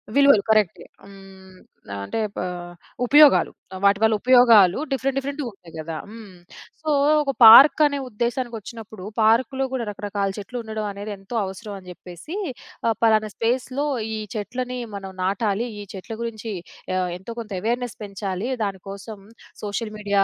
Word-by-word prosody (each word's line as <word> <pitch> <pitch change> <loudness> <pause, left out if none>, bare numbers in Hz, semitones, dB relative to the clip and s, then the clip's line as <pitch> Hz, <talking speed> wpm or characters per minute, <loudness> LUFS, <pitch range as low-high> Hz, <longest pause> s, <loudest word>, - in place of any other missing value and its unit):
విలువలు. 280 -6 +6
కరెక్ట్. 215 -5 +3 0.3
హ్మ్. 195 -1 -15 0.5
అంటే 225 - -3 0.2
పా - - -3 0.6
ఉపయోగాలు. 295 +3 +6 0.3
వాటి 200 0 +4
వల్ల 220 0 +4
ఉపయోగాలు 235 -7 +6
డిఫరెంట్ 270 0 -1
డిఫరెంట్‌గా 280 +1 -3
ఉంటాయి 175 -5 -17
కదా. 160 +1 -5
హ్మ్. 215 -4 -12 0.5
సో, 315 - -3 0.3
ఒక 275 - -1
పార్క్ 265 +8 +10
అనే 285 -1 0
ఉద్దేశానికొచ్చినప్పుడు 230 -3 -5 0.2
పార్క్‌లో 250 +5 +3
గూడా 260 -2 -2
రకరకాల 205 -1 -3
చెట్లు 205 +5 -7
ఉండడం 220 -1 -4
అనేది 205 +1 -7
ఎంతో 195 +5 -9
అవసరం 200 +2 -7
అని 185 - -17
జెప్పేసి 180 - -10 0.5
ఆహ్, 225 - +2
పలానా 215 -1 +3
స్పేస్‌లో 255 +4 -1 0.3
ఈ - - -3 0.2
చెట్లని 250 +4 -4 0.2
మనం 195 -1 -7
నాటాలి. 205 +4 0
ఈ - - -6
చెట్ల 195 +4 -8
గురించి 225 -1 -5 0.4
ఆహ్, 185 -1 0
ఎంతో 190 +6 -8
కొంత 220 -2 -8
అవేర్‌నెస్ 240 +2 -2
పెంచాలి. 200 +2 -4
దానికోసం 200 +2 -6 0.4
సోషల్ 215 +1 -3
మీడియా 200 -1 +2
215 Hz, 140 wpm, -23 LUFS, 195-245 Hz, 0.6 s, పార్క్